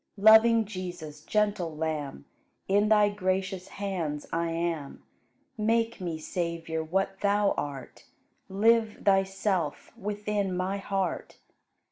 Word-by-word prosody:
Loving 220 +2 +7
Jesus, 175 -7 -7
gentle 200 -7 0
Lamb, 150 - -3 0.4
In 205 +2 +3
Thy 210 -1 +5
gracious 185 -1 -2
hands 175 -7 -4
I 165 0 0
am; 165 -3 -3 0.6
Make 230 0 +1
me, 170 -3 -3
Savior, 165 0 -3
what 195 +4 -1
Thou 205 0 +2
art, 135 -4 -6 0.4
Live 220 +2 +2
Thyself 195 -4 0
within 205 -2 -2
my 185 +2 -1
heart. 195 -3 -3
190 Hz, 105 wpm, -28 LUFS, 165-205 Hz, 0.6 s, Loving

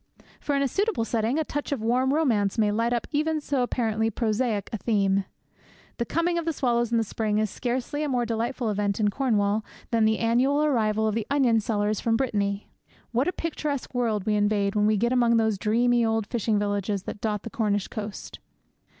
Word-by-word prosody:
For, 290 - -1
in 280 - +2
a - - +2
suitable 390 - 0
setting, 230 +4 0
a 320 - +1
touch 290 -1 -4
of 280 - 0
warm 250 +3 +2
romance 235 -11 +1
may 210 -2 +3
light 230 +3 0
up 240 -1 0
even 310 +1 0
so 285 -3 -1
apparently 225 -3 0
prosaic 220 -2 -1
a - - 0
theme. 195 -3 +1 0.7
The 235 - -1
coming 340 +1 0
of 335 - -5
the 330 - 0
swallows 240 -4 0
in 235 - +3
the 225 - +2
spring 215 0 -1
is 215 -2 0
scarcely 255 +4 -3
a 300 - -1
more 245 -2 +1
delightful 230 +1 -2
event 205 0 -1
in 210 -1 +2
Cornwall 215 -4 +1 0.3
than 225 -2 +3
the 220 0 +2
annual 255 +6 +2
arrival 220 -6 +1
of 215 - 0
the 220 0 -2
onion 260 -5 +3
sellers 210 -1 -1
from 225 -1 +1
Brittany. 205 -5 -1 0.4
What 245 +5 +1
a - - +2
picturesque 305 -6 -4
world 225 -5 0
we 215 - +1
invade 205 -1 +1
when 210 0 +2
we 215 0 +3
get 235 +4 +1
among 235 -2 +4
those 220 -3 +1
dreamy 240 +3 +2
old 225 -1 +1
fishing 220 -1 0
villages 205 -1 -1
that 205 - -7
dot 210 -2 -1
the 230 - -7
Cornish 205 -3 0
coast! 210 -2 -7
225 Hz, 205 wpm, -26 LUFS, 210-255 Hz, 0.7 s, among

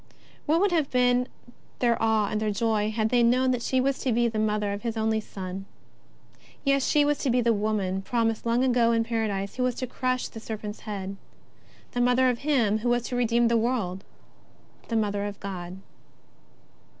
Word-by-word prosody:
What 315 +3 +3
would 400 0 +2
have 315 -5 +1
been 250 0 +2 0.5
their 240 -2 +2
awe 220 -2 +2
and 215 0 -1
their 215 - 0
joy 215 0 0
had 220 0 0
they 245 0 +3
known 255 +2 +3
that 250 -1 -1
she 260 +2 +1
was 270 +1 0
to 260 - -1
be 235 +1 +2
the 220 -2 -2
Mother 210 -1 0
of 200 - -5
His 230 -1 -3
only 220 0 +1
Son! 190 -1 -7 1.0
Yes, 275 -1 +2
she 295 -1 +4
was 295 0 +1
to 275 - -1
be 250 +1 +3
the 235 -1 +3
woman 205 -3 -1
promised 225 +1 -1
long 235 +2 +1
ago 240 -2 +3
in 230 0 +2
Paradise 220 -3 -2
who - - -1
was 250 -1 0
to 255 - -3
crush 255 +1 -2
the 225 - -9
serpent's 215 -1 -6
head, 195 -1 -5 0.7
the 245 - -1
Mother 250 +1 +4
of 240 - -5
Him 240 -8 +2
who 240 +2 -1
was 240 -1 +2
to 250 - -3
redeem 235 -1 +2
the 235 0 +3
world, 220 -6 -1 0.8
the 230 - -2
Mo 215 -2 +1
ther 200 0 -2
of 205 -1 -6
God. 185 -2 -6
230 Hz, 200 wpm, -26 LUFS, 210-250 Hz, 1.0 s, she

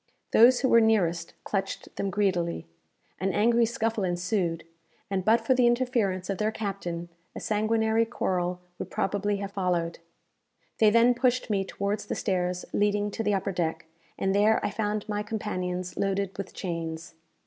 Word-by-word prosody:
Those 245 +2 +6
who 265 - +3
were 230 -2 +6
nearest 175 -7 +1
clutched 195 -1 -3
them 200 - -2
greedily. 180 - 0 0.5
An 190 +2 0
angry 230 +4 +3
scuffle 225 -3 -1
ensued, 175 -1 -1 0.5
and 190 -1 0
but 225 +4 +4
for 260 - +4
the 250 -1 +4
interference 240 -7 +1
of 195 - -3
their 215 0 +2
captain, 195 -6 -4 0.3
a - - -4
sanguinary 220 +1 +1
quarrel 180 -5 -1 0.2
would - - -5
probably 205 +1 -1
have 200 0 -5
followed. 175 -4 -1 0.8
They 215 - +6
then 230 +3 +5
pushed 250 -1 +1
me 195 -2 +1
towards 200 +2 -3
the - - -2
stairs 180 -2 -1
leading 205 0 +1
to 225 - -3
the 210 -2 +1
upper 195 +1 -1
deck, 165 -3 -2 0.3
and 195 0 0
there 210 +2 +4
I - - -1
found 210 0 -2
my 210 -1 -1
companions 185 -4 -3
loaded 195 -1 -1
with 195 -1 -6
chains. 165 -3 -5
200 Hz, 160 wpm, -27 LUFS, 180-220 Hz, 0.8 s, Those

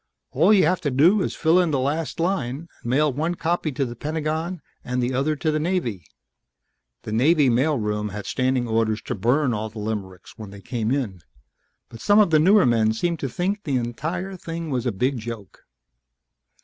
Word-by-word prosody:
All 165 +10 +4
you 195 -6 +5
have 180 +3 +1
to 145 - 0
do 165 +10 +4
is - - -2
fill 165 +3 +3
in 175 -2 +2
the 145 - +1
last 145 +6 -2
line, 165 -4 -1
and 120 - -6
mail 145 +2 +2
one 160 +6 -1
copy 170 -2 -1
to 135 0 -1
the 120 -1 -7
Pentagon 155 +5 -3 0.2
and 125 +1 -3
the 125 +1 0
other 140 +4 0
to 155 +1 -1
the 155 - 0
Navy 150 - -2 0.5
..." - - -53
The - - -6
Naval 140 +4 +3
mail 140 +5 +2
room 105 -1 -2
had 105 +1 -7
standing 130 -1 0
orders 110 -1 0
to - - -3
burn 125 +6 +1
all 110 0 -3
the 110 - -13
limericks 105 -1 -6
when 105 -2 -8
they 100 +1 -11
came 115 0 -3
in, 120 -10 -2 0.7
but 115 - -12
some 205 - +4
of 205 -5 +5
the 155 - +5
newer 195 +6 +5
men 110 -2 +3
seemed 170 +8 -1
to 135 - -3
think 195 - -2
the 140 - -1
entire 160 +11 -4
thing 165 -2 -6
was 125 -1 -1
a - - +1
big 125 +6 -1
joke. 110 -5 -9
135 Hz, 205 wpm, -23 LUFS, 115-165 Hz, 0.7 s, you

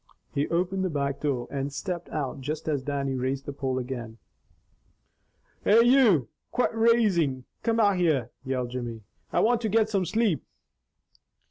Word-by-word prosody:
He 145 0 0
opened 185 +3 0
the 185 - 0
back 140 -3 -2
door 130 -5 -1
and 140 0 -2
stepped 175 +3 -4
out 140 -2 -3
just 150 +4 -4
as 145 -3 0
Dannie 140 0 -2
raised 130 +1 -2
the 145 - -5
pole 135 -2 -2
again. 120 -3 -5 1.5
"Hey, 225 +3 +6
you! 235 - +5 0.2
Quit 250 - +1
raisin' 205 - +2 0.2
Cain 230 -1 +1
out 200 -4 +3
there!" 150 -9 +1
yelled 130 -2 -2
Jimmy. 120 -3 -5 0.3
"I - - +2
want 235 +1 +3
to 220 - -1
get 220 +1 +3
some 195 -3 +1
sleep." 215 - +1
150 Hz, 155 wpm, -27 LUFS, 130-205 Hz, 1.5 s, Hey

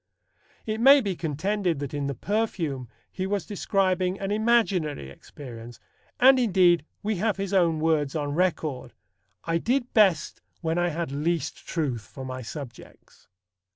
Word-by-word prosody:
It 220 0 -2
may 275 +3 +8
be 200 -7 -2
contended 175 +3 -1
that 140 0 -5
in 145 -1 -2
The 140 - -3
Perfume 165 - -2 0.2
he 185 0 -3
was 200 -4 -1
describing 185 -1 0
an 195 0 -3
imaginary 205 - +1
experience, 120 - -11 0.4
and 260 +1 +7
indeed 180 -8 +4 0.2
we 210 -1 -1
have 210 +2 0
his 195 0 -3
own 170 -4 +3
words 155 -3 +1
on 145 -2 -2
record: 155 -6 -1 0.5
"I 165 0 0
did 250 +5 -1
best 195 -8 +3 0.2
when 165 0 0
I 175 0 +2
had 165 -2 -3
least 155 +2 -2
truth 140 - -2
for 130 +4 -10
my 130 0 -5
subjects." 125 0 -11
170 Hz, 150 wpm, -26 LUFS, 145-200 Hz, 0.5 s, may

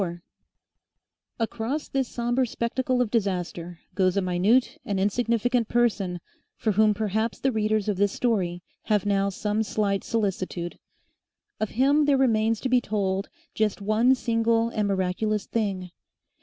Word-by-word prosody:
4 175 -2 -4 1.2
Across 235 +6 -2
this 270 -2 0
sombre 240 +2 0
spectacle 250 +2 0
of 220 - -6
disaster 180 -5 -2 0.2
goes 185 0 +2
a - - +3
minute 225 - +2
and 205 -6 -2
insignificant 235 +3 +1
person 205 -7 +1 0.4
for 220 - 0
whom 210 +1 +3
perhaps 220 +2 -1
the 270 - +1
readers 215 -2 0
of 205 -3 0
this 205 0 +2
story 180 -8 -1 0.2
have 210 -2 +1
now 200 -1 +2
some 210 +2 -1
slight 205 -2 0
solicitude. 190 -5 -2 0.8
Of 215 - -1
him 285 +3 +4
there 285 -1 +4
remains 225 -4 +2
to - - -1
be 250 0 +4
told 195 -3 -1 0.2
just 215 -1 0
one 215 +6 +3
single 230 -1 +1
and 215 -3 -1
miraculous 195 +2 0
thing. 195 -5 -2
215 Hz, 140 wpm, -26 LUFS, 195-235 Hz, 1.2 s, him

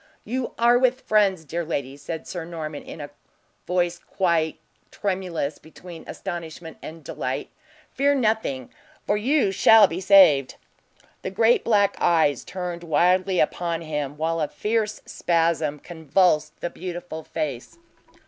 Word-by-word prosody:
"You 250 +3 -3
are 240 +1 +5
with 255 0 +2
friends, 195 -6 +2
dear 170 +4 -3
lady!" 140 -4 -3
said 155 +3 -6
Sir 175 -3 -5
Norman, 160 -3 -6
in - - -10
a 145 -1 -7 0.6
voice 175 -1 0
quite 170 -4 0 0.3
tremulous 185 -7 -3
between 165 +1 -12
astonishment 165 -3 -7
and 160 0 -9
delight. - - -4 0.4
"Fear 285 +1 +2
nothing, 215 - -1 0.3
for 205 - +1
you 240 0 +2
shall 220 +2 +7
be 180 0 -3
saved." 185 -9 +6 0.7
The - - -4
great 225 +5 +3
black 205 -3 +2
eyes 160 -6 +3
turned 180 -2 -5
wildly 180 +4 +2
upon 170 +1 0
him, 150 -3 -4
while 165 +1 -1
a 150 - +1
fierce 215 +3 -2
spasm 165 -3 0
convulsed 160 -1 +1
the 175 - -3
beautiful 175 -3 -6
face. 145 - -5
175 Hz, 135 wpm, -24 LUFS, 155-195 Hz, 0.7 s, shall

